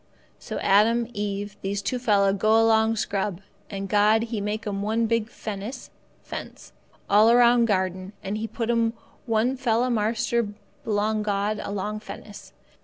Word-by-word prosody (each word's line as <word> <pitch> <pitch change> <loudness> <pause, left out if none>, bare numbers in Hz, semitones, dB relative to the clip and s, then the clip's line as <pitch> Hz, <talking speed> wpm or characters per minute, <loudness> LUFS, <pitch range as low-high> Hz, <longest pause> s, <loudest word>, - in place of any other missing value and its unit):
"So - - -6
Adam 225 +4 +3
Eve 205 -1 -4
these 200 +1 -3
two 250 - -1
fella 200 -5 +3
go 215 +3 +3
along 225 0 +3
scrub. 200 -3 -2 0.3
And 195 -1 -5
God 210 +2 +3
He 225 -2 -3
make 210 +2 -3
'm 200 -1 -3
one 220 +3 0
big 230 -1 0
fennis 215 +4 -7 0.3
(fence) - - -9 0.3
all 210 +2 +5
around 240 0 +5
garden 185 -2 -1
and 195 +2 -3
He 220 +1 -3
put 230 0 -2
'm 230 -1 +1 0.3
one 230 +3 +1
fella 245 0 +1
marster 230 +1 0 0.4
belong 215 0 0
God 205 0 -1
along 205 +1 -3
fennis. 210 -1 -10
215 Hz, 150 wpm, -25 LUFS, 205-230 Hz, 0.4 s, all